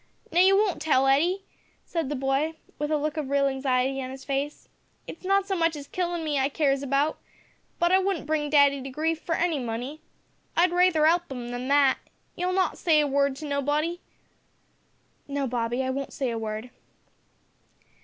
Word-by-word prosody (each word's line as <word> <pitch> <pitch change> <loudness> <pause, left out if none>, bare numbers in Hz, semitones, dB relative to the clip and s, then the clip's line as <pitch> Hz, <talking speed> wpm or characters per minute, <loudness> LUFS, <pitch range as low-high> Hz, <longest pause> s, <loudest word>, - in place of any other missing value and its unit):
"Now 345 - +2
you 385 +2 +6
won't 405 -6 +1
tell, 285 -4 +3
Hetty?" 335 +9 +2 0.4
said 330 -6 -2
the 295 - -2
boy 270 +4 0 0.2
with 295 0 -1
a 310 - +2
look 305 +1 -2
of 295 -3 -3
real 280 0 +2
anxiety 265 0 0
on 255 - -5
his 265 0 -9
face. 280 +1 -3 0.4
"It's 330 - -10
not 390 +1 +2
so 390 - 0
much 330 -2 +1
his 285 -1 -7
killin' 345 +1 -2
me 295 -3 0
I 270 +1 +2
cares 275 -2 +1
about, 280 +2 0 0.6
but 345 +1 +2
I 375 - +6
wouldn't 380 -4 -1
bring 305 -1 -1
daddy 285 -2 +4
to 270 - -6
grief 315 +4 -1
for 330 - -1
any 335 -4 0
money. 245 +5 -5 0.6
I'd 345 +1 +4
raither 355 -3 +4
'elp 340 -1 +2
'im 245 -2 -5
than 245 +1 -4
that. 280 -1 +4 0.4
You'll 360 +1 -1
not 370 -3 0
say 320 -3 +4
a 300 - +3
word 280 -1 +1
to 305 - -8
nobody?" 295 +4 -1 1.3
"No, 280 -1 -2
Bobby, 240 0 -1
I 260 - -1
won't 275 +1 -4
say 265 -4 -2
a 230 - -3
word." 220 +2 -5
290 Hz, 190 wpm, -26 LUFS, 270-330 Hz, 1.3 s, you